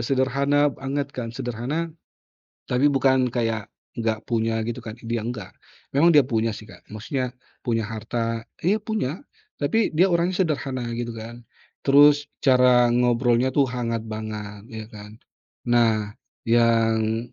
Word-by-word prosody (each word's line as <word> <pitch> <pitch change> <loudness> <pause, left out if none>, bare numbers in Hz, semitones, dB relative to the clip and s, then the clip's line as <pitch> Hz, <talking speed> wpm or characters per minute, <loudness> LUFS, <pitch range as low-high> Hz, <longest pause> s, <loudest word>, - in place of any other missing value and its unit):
Sederhana 140 +3 +2
banget 140 +1 -4
kan, 120 -2 -5
sederhana, 130 +6 -3 0.9
tapi 125 +3 +2
bukan 130 -3 +3
kayak 115 -3 -1 0.3
enggak 110 -1 -1
punya 115 -1 0
gitu 120 +2 -3
kan, 115 -3 -7
dia 115 -1 -4
nggak. 110 -6 -5 0.4
Memang 165 +5 +4
dia 145 - +8
punya 115 -3 -1
sih 110 +1 -10
Kak - - -15
maksudnya 125 +3 -3 0.3
punya 115 -2 +1
harta, 115 +1 -3 0.2
iya 195 +6 +2
punya, 210 - -3 0.4
tapi 225 0 +1
dia 170 +4 +3
orangnya 175 0 +1
sederhana 135 -5 -3
gitu 120 -1 -4
kan. 120 +2 -8 0.4
Terus 145 +1 +5 0.2
cara 125 -2 +5
ngobrolnya 120 +1 +2
tuh 140 +1 +2
hangat 115 -3 -3
banget 105 -1 -6
ya 110 -1 -7
kan. 105 +1 -11 0.6
Nah 110 -3 +2 0.3
yang 115 -1 +2
120 Hz, 135 wpm, -24 LUFS, 115-135 Hz, 0.9 s, dia